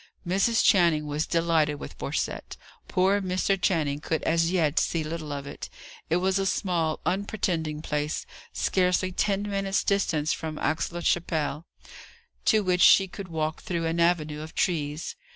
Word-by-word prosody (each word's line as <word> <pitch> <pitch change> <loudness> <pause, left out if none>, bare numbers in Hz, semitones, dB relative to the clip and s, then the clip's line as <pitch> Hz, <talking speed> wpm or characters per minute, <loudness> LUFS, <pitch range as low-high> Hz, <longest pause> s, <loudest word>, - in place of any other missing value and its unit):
Mrs. 200 +6 +2
Channing 170 -6 +4
was 150 +1 -2
delighted 165 -3 +2
with - - -8
Borcette. - - -3 0.3
Poor 195 +2 +2
Mr. 185 +1 +1
Channing 160 -7 0
could 160 +1 -2
as 165 0 +2
yet 165 -5 +2
see 165 -2 0
little 155 -1 -5
of 140 -1 -4
it. 140 - -8 0.4
It 165 - +2
was 190 +2 +1
a 195 - 0
small, 170 -5 0
unpretending 175 -6 -1
place, 150 0 -2 0.3
scarcely 185 0 +1
ten 195 +2 0
minutes' 195 -1 -1
distance 160 -6 +1
from 155 -2 -5
Aix 155 +3 -1
la 175 0 -5
Chapelle, 160 -2 -1 0.8
to 215 -2 +4
which 180 -1 +1
she 195 - +7
could 195 +1 -8
walk 160 -2 -3
through 170 -2 -2
an 165 +1 -1
avenue 155 -3 +1
of 160 +1 -9
trees. 150 -3 -1
170 Hz, 155 wpm, -26 LUFS, 155-185 Hz, 0.8 s, she